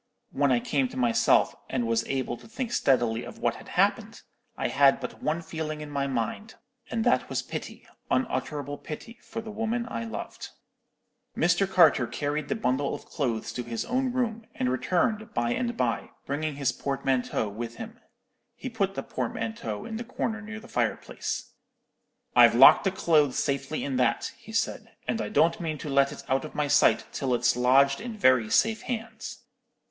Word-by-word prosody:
When 140 -1 +2
I 125 - +4
came 135 +1 0
to 125 - -10
myself, 120 -2 +3 0.2
and 120 - -1
was 115 0 +1
able 130 -3 -1
to - - -15
think 235 +1 -4
steadily 120 - +2
of - - -9
what - - 0
had - - -13
happened, - - 0 0.3
I - - -1
had 140 0 +5
but 125 - -7
one 160 +2 -1
feeling 155 -2 -4
in 150 -1 -7
my 140 -1 -1
mind; 135 - -3 0.3
and 230 -1 -1
that - - +2
was - - -1
pity, - - -7 0.2
unutterable 145 - -1
pity, 230 +10 -8
for 225 - -6
the 220 -1 -8
woman 225 +2 -1
I 115 0 -4
loved. 110 - -6 0.9
"Mr. 175 +3 +3
Carter 160 -9 +5
carried 145 +2 -2
the - - -1
bundle 140 - 0
of - - -10
clothes 120 -8 -2
to 125 - -3
his 120 -1 -4
own 255 +1 0
room, 230 -3 -2
and 125 0 0
returned 210 - 0
by 120 0 +1
and 240 - -2
by, - - -1 0.2
bringing 150 +1 -2
his 140 -2 +1
portmanteau 135 -4 -1
with 115 +3 -6
him. 225 +2 -9 0.6
He 260 - -6
put 195 -4 -1
the 135 - -3
portmanteau 115 -3 -4
in 220 0 -5
a - - -3
corner 225 -2 -3
near 220 +1 -7
the 230 - -14
fireplace. - - -2 0.8
"'I've - - +7
locked - - +8
the 195 - +3
clothes 155 -7 +2
safely 140 +2 -1
in 135 -2 -2
that,' 125 - +1
he - - -13
said; - - -2
'and - - 0
I 105 - -3
don't 160 +3 +3
mean 160 -3 -3
to 150 - -6
let 140 0 +3
it - - -9
out 135 -1 +1
of - - -9
my 150 -1 0
sight - - +4
till 130 -3 0
it's 120 0 +2
lodged 135 +3 +4
in 230 -1 -6
very 130 - +4
safe 220 - +3
hands. 225 -2 -6
145 Hz, 185 wpm, -27 LUFS, -, 0.9 s, locked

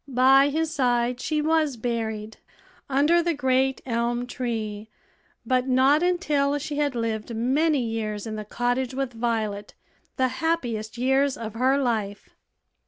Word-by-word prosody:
By 270 +2 +5
his 320 +2 -1
side 245 -3 +1
she 305 -1 -1
was 310 -4 +1
buried, 220 -2 -3 0.5
under 295 +6 +3
the 340 -1 0
great 265 -1 +1
elm 240 0 -1
tree, 220 -4 -4 0.6
but 255 0 +1
not 265 +4 +4
until 300 -6 +1
she 290 0 -5
had 290 -3 0
lived 230 0 -3
many 275 +5 +1
years 215 -2 -3
in 220 -1 -5
the 215 - -5
cottage 245 +4 -2
with 270 -2 -2
Violet 225 -3 -2 0.4
the 260 0 +2
happiest 240 -10 -1
years 265 +2 +2
of 220 -2 -6
her 260 +4 +2
life. 220 -6 -2
255 Hz, 140 wpm, -25 LUFS, 225-280 Hz, 0.6 s, By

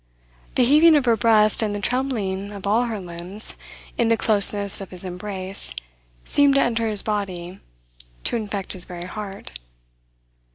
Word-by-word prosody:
The 255 - +4
heaving 310 +5 +6
of 285 -3 +2
her 235 -2 +4
breast 215 -1 +3
and 210 -2 -1
the - - -3
trembling 205 -5 -2
of 200 -1 -8
all 220 +5 +2
her 225 -3 -4
limbs, 180 +4 -2 0.4
in 235 - +3
the 230 0 +2
closeness 205 -2 +3
of 195 - -8
his 185 0 +1
embrace, 185 - -4 0.5
seemed 285 -1 +4
to - - +4
enter 230 -1 0
his 210 -2 0
body, 190 -4 -4 0.6
to - - +1
infect 205 -4 -3
his 180 -2 -2
very 175 -1 -8
heart. 200 +1 -7
205 Hz, 160 wpm, -22 LUFS, 190-230 Hz, 0.6 s, heaving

